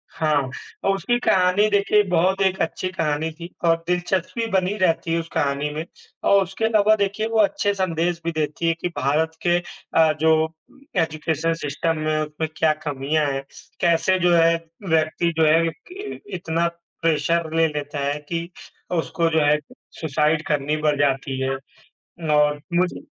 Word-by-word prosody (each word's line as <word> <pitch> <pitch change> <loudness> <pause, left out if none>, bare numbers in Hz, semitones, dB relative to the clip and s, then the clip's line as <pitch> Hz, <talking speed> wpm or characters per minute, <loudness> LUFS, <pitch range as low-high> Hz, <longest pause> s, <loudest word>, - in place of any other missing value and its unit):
हाँ, 155 -1 +1 0.5
और 195 - +2
उसकी 220 +6 0
कहानी 185 -1 +3
देखिए 205 +1 +3
बहुत 185 +3 +2
एक 190 -1 +2
अच्छी 175 +3 -1
कहानी 155 -3 -1
थी 170 0 -7 0.2
और 165 0 +5
दिलचस्पी 180 +5 -1
बनी 190 +1 +1
रहती 165 -3 +1
है, 165 - +2
उस 165 - -5
कहानी 140 +1 0
में, 155 +2 -4 0.4
और 200 0 +5
उसके 190 +4 -3
अलावा 215 -1 +4
देखिए 205 +1 -1
वो 225 0 0
अच्छे 205 0 +2
संदेश 175 -3 -1
भी 170 - 0
देती 155 +1 -2
है 165 - +3
कि 180 - -1
भारत 155 +4 +1
के 175 0 +4
अ, 160 -2 0
जो 160 0 +3 0.5
एजुकेशन 160 +1 -1
सिस्टम 165 +1 -2
में 155 0 0
उसमें 155 +1 -3
क्या 160 -1 +3
कमियाँ 145 +2 0
हैं, 135 0 -3 0.4
कैसे 170 +2 +3
जो 175 -1 +3
है 165 0 +5 0.3
व्यक्ति 160 +1 +1
जो 160 - +4
है 165 +2 +4
कि 365 - -11
इ - - -10 0.2
इतना 170 -1 0 0.3
प्रेशर 165 0 +1
ले 165 0 +4
लेता 145 -1 -5
है 145 +1 0
कि 170 0 -3 0.4
उसको 165 -1 0
जो 160 0 +2
है 150 +1 +4 0.4
सुसाइड 155 0 +1
करनी 150 0 0
पड़ 150 -1 +2
जाती 135 -1 0
है 130 - 0 0.9
और 150 0 +3
मुझे 180 +1 +1
165 Hz, 165 wpm, -22 LUFS, 155-180 Hz, 0.9 s, और